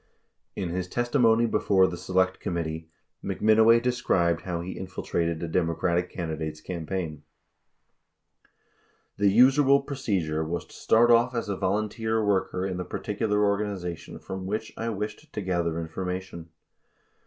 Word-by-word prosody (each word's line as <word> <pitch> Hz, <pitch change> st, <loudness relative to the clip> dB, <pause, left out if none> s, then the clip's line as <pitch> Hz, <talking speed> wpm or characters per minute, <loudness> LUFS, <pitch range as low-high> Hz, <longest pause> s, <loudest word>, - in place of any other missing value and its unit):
71 95 Hz, -, -3 dB
In -, -, -4 dB
his 90 Hz, -1 st, -2 dB
testimony 120 Hz, +1 st, +3 dB
before 100 Hz, -4 st, +3 dB
the 90 Hz, -, -2 dB
Select 95 Hz, +1 st, 0 dB
Committee, 80 Hz, -2 st, -4 dB, 0.3 s
McMinoway 110 Hz, +2 st, +4 dB
de 125 Hz, +1 st, +1 dB
scribed 85 Hz, -9 st, +1 dB
how 85 Hz, -2 st, -3 dB
he 90 Hz, +2 st, -5 dB
infiltrated 85 Hz, -3 st, -3 dB
a -, -, -2 dB
Democratic 85 Hz, +1 st, 0 dB
candidate's 80 Hz, -3 st, -4 dB
campaign: 85 Hz, -3 st, -4 dB, 2.0 s
"The 100 Hz, 0 st, +4 dB
usual 135 Hz, +6 st, +5 dB
procedure 100 Hz, -, -2 dB
was 85 Hz, +2 st, -3 dB
to -, -, -18 dB
start 120 Hz, +2 st, +4 dB
off 120 Hz, +2 st, +4 dB
as 115 Hz, -3 st, -2 dB
a 100 Hz, -, -1 dB
volunteer 110 Hz, +3 st, -1 dB
worker 95 Hz, -2 st, 0 dB
in 95 Hz, -2 st, -3 dB
the 90 Hz, -, -3 dB
particular 105 Hz, +2 st, -1 dB
organization 100 Hz, -4 st, -3 dB
from 95 Hz, -1 st, -6 dB
which 110 Hz, +2 st, -3 dB
I 115 Hz, +1 st, -3 dB
wished 105 Hz, 0 st, -5 dB
to -, -, -4 dB
gather 85 Hz, -4 st, -1 dB
information." 90 Hz, 0 st, -5 dB
95 Hz, 140 wpm, -26 LUFS, 85-110 Hz, 2.0 s, usual